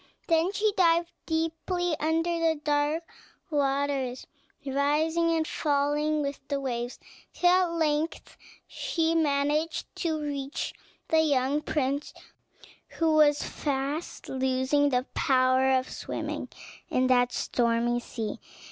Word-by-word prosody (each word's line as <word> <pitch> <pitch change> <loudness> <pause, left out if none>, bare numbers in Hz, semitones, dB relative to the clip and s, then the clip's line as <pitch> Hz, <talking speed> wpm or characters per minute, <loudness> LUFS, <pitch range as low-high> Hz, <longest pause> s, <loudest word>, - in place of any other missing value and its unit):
Then 330 +2 +3
she 415 +1 +1
dived 340 -2 +3 0.2
deeply 330 +2 -1
under 330 +2 0
the 325 -2 +1
dark 295 +2 +1 0.5
waters, 275 -3 0 0.4
rising 300 +5 +1
and 325 -1 +1
falling 295 +1 0
with 280 0 -3
the 280 -1 -1
waves, 245 -2 -3 0.4
till 355 - +2
at 365 -1 +3
length 315 -1 -1 0.3
she 325 -1 -1
managed 300 0 0
to 320 -3 -1
reach 285 -1 -4 0.4
the 320 0 +4
young 285 -1 +1
prince, 285 -1 -2 0.8
who 325 -1 +2
was 295 -1 +4
fast 285 +3 -3
losing 265 +2 +1
the 250 -1 +1
power 260 -3 +3
of 260 -1 +2
swimming - - -5 0.4
in 255 - +2
that 245 -1 +3
stormy 240 0 +1
sea. 225 -2 -5
295 Hz, 115 wpm, -28 LUFS, 265-325 Hz, 0.8 s, the